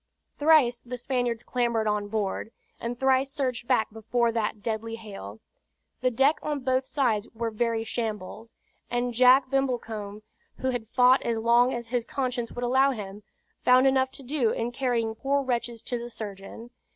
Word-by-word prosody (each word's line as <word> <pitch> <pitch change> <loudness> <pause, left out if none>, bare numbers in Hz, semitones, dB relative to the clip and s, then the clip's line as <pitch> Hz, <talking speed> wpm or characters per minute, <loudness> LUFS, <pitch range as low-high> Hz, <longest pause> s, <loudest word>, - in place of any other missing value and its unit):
Thrice 290 -6 +5
the 250 +1 -7
Spaniards 245 -2 -1
clambered 235 -3 0
on 210 -1 0
board; 210 +1 -2 0.3
and 235 +1 -4
thrice 265 0 +2
surged 255 -4 -2
back 250 -5 +2
before 230 +2 0
that 215 -2 -2
deadly 225 0 -3
hail. 195 - -9 0.6
The 255 - +3
deck 270 +6 +3
on 295 -2 -2
both 260 0 0
sides 250 -6 0
were 230 0 -2
very 230 0 0
shambles; 225 -1 -5 0.3
and 245 0 -1
Jack 255 +2 +5
Brimblecombe, 225 -6 -2 0.3
who 260 0 -1
had 240 -3 -4
fought 250 +2 +5
as 230 -1 -1
long 235 +3 +4
as 235 -2 -5
his 245 -1 0
conscience 250 -2 -3
would 245 - -5
allow 260 +3 +4
him, 205 -5 -6 0.4
found 255 +1 +6
enough 265 -1 +3
to 275 - -8
do 260 -3 +1
in 230 +2 -2
carrying 240 -3 -1
poor 275 +5 0
wretches 240 -2 -2
to 245 -2 -3
the 240 +1 -6
surgeon. 215 +2 -8
240 Hz, 165 wpm, -27 LUFS, 225-260 Hz, 0.6 s, found